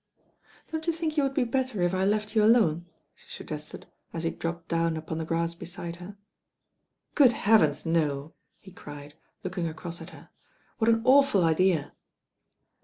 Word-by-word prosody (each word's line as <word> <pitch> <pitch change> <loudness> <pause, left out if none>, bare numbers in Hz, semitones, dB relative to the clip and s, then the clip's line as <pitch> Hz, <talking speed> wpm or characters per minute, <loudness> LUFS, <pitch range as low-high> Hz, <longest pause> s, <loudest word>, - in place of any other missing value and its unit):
"Don't 320 +1 -4
you 335 - +2
think 320 -1 -3
you 300 - +3
would 275 -1 -1
be 270 - +3
better 245 -5 -1
if 175 +1 +1
I 190 0 +1
left 210 +1 0
you 215 - +5
alone?" 200 -7 +3 0.3
she - - -23
suggested, 150 0 -7 0.3
as 165 - -5
he 165 - 0
dropped 170 0 -5
down 165 -1 0
upon 160 0 -5
the 160 - -3
grass 165 +1 -1
beside 170 0 -7
her. 190 +3 -10 1.0
"Good 265 -5 +6
heavens, 200 -11 +3
no 155 -3 0
I" - - -48 0.2
he 190 - -14
cried, 145 -4 -11 0.3
looking 180 -2 -3
across 165 +1 -7
at - - -9
her. - - -15 0.5
"What 225 0 +3
an 225 0 +3
awful 270 -7 +5
idea." 165 -1 +2
175 Hz, 175 wpm, -27 LUFS, 165-225 Hz, 1.0 s, Good